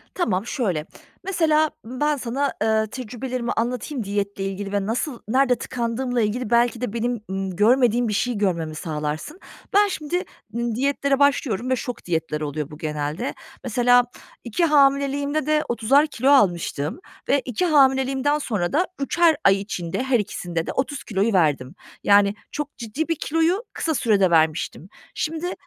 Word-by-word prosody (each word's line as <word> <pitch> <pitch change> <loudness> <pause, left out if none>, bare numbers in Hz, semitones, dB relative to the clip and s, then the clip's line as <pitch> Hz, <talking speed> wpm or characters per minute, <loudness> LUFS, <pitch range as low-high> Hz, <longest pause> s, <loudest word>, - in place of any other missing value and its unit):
Tamam 215 - 0
şöyle, 185 - -1 0.4
mesela, 315 -5 +2
ımm, 250 +2 -7
ben 295 0 +2
sana, 270 +3 -1
ııı, 220 0 +2
tecrübelerimi 250 +1 -4
anlatayım 245 +2 -2
diyetle 200 -1 -2
ilgili 195 +1 -4
ve 200 -1 0
nasıl 245 +3 -2
nerede 255 +1 +3
tıkandığımla 245 0 -2
ilgili 220 +2 -1
belki 235 0 +2
de 235 -3 -3
benim, 235 -1 -1
ımm, 190 -1 -3
görmediğim 240 +2 +3
bir 210 - -1
şey 245 +4 0
görmemi 170 -6 -1
sağlarsın. 155 - -4 0.3
Ben 410 +1 +5
şimdi, 355 0 -2 0.3
ımm, 235 -1 -1
diyetlere 280 +2 +1
başlıyorum 260 -5 +2
ve 260 - +3
şok 245 0 -6
diyetler 160 -3 -2
oluyor 150 0 -4
bu 150 - -9
genelde. 150 - -3 0.3
Mesela 245 0 +4 0.4
2 250 +9 0
hamileliğimde 280 0 +2
de 305 0 +2
30'ar 260 +6 +3
kilo 270 -1 0
almıştım 175 - +2 0.3
ve 280 - +3
2 250 +8 -1
hamileliğimden 270 -1 +3
sonra 205 -9 -2
da 355 +5 +2
3'er 330 +3 +3
ay 195 0 +4
içinde 180 +1 -3
her 265 -2 +2
ikisinde 175 -5 -3
de - - -1
30 275 +1 -2
kiloyu 205 +1 0
verdim. 145 -7 +1 0.3
Yani, 200 0 +5 0.2
çok 295 -1 -5
ciddi 250 +7 -3
bir 330 - 0
kiloyu 330 +9 0
kısa 320 - -1
sürede 210 -7 +3
vermiştim. 160 +2 +1 0.3
Şimdi, 325 +3 -2
240 Hz, 155 wpm, -23 LUFS, 195-280 Hz, 0.4 s, Ben